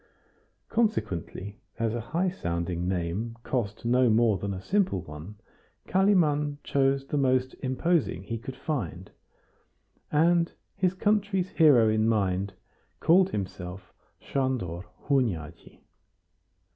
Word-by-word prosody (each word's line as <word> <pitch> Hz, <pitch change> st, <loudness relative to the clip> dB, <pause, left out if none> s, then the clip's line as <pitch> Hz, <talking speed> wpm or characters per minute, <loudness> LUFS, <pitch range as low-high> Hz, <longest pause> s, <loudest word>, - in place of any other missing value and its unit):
Consequently, 105 Hz, -, -2 dB, 0.2 s
as 115 Hz, -1 st, 0 dB
a 120 Hz, -, -2 dB
high 170 Hz, -, -1 dB
sounding 85 Hz, -, -3 dB
name 95 Hz, +6 st, -2 dB
cost 115 Hz, -4 st, -3 dB
no 125 Hz, +1 st, +4 dB
more 110 Hz, -3 st, +3 dB
than 100 Hz, +2 st, -3 dB
a 95 Hz, -, -4 dB
simple 185 Hz, -, 0 dB
one, 75 Hz, +6 st, -9 dB, 0.5 s
Kalimann 155 Hz, -7 st, +2 dB
chose 135 Hz, 0 st, +1 dB
the 145 Hz, -, -2 dB
most 130 Hz, -1 st, +2 dB
imposing 135 Hz, -, 0 dB
he 115 Hz, +3 st, -4 dB
could 130 Hz, +3 st, -7 dB
find, 120 Hz, -, -4 dB, 1.0 s
and, 170 Hz, +2 st, +3 dB, 0.2 s
his 185 Hz, 0 st, +1 dB
country's 200 Hz, -2 st, +1 dB
hero 140 Hz, -9 st, +5 dB
in 110 Hz, +1 st, +2 dB
mind, 100 Hz, -3 st, 0 dB, 0.5 s
called 185 Hz, +3 st, +5 dB
himself 95 Hz, -, -6 dB, 0.3 s
Sandor 120 Hz, -11 st, -2 dB, 0.2 s
Hunyadi. 90 Hz, -, -1 dB
120 Hz, 110 wpm, -27 LUFS, 95-155 Hz, 1.0 s, hero